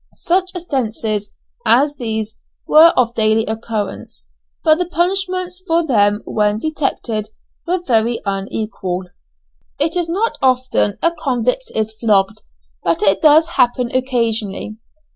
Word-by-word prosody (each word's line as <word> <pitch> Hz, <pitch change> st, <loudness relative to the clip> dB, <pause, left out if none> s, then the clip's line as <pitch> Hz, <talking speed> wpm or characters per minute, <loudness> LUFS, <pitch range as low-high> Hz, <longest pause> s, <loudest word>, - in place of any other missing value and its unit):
Such 370 Hz, +1 st, 0 dB
offences 220 Hz, -, -2 dB, 0.3 s
as 285 Hz, -, +3 dB
these 220 Hz, -2 st, -4 dB, 0.3 s
were 320 Hz, +2 st, +8 dB
of 235 Hz, -2 st, +2 dB
daily 220 Hz, 0 st, +2 dB
occurrence, 215 Hz, -, -5 dB, 0.3 s
but 310 Hz, +1 st, +4 dB
the 360 Hz, -, -1 dB
punishments 365 Hz, +1 st, -1 dB
for 330 Hz, 0 st, +2 dB
them 210 Hz, -6 st, +2 dB
when 210 Hz, -1 st, 0 dB
detected 235 Hz, -6 st, -2 dB, 0.4 s
were 355 Hz, 0 st, -1 dB
very 230 Hz, -1 st, +2 dB
unequal. 195 Hz, -2 st, -3 dB, 0.7 s
It 315 Hz, +4 st, 0 dB
is 350 Hz, -2 st, -1 dB
not 415 Hz, +7 st, -1 dB
often 255 Hz, -5 st, +1 dB
a 335 Hz, -, +4 dB
convict 265 Hz, -, -2 dB
is 220 Hz, 0 st, 0 dB
flogged, 210 Hz, -4 st, +1 dB, 0.4 s
but 165 Hz, +3 st, 0 dB
it 195 Hz, -1 st, +3 dB
does 315 Hz, +1 st, +6 dB
happen 245 Hz, 0 st, +1 dB
occasionally. 230 Hz, -5 st, -1 dB
240 Hz, 125 wpm, -18 LUFS, 215-325 Hz, 0.7 s, were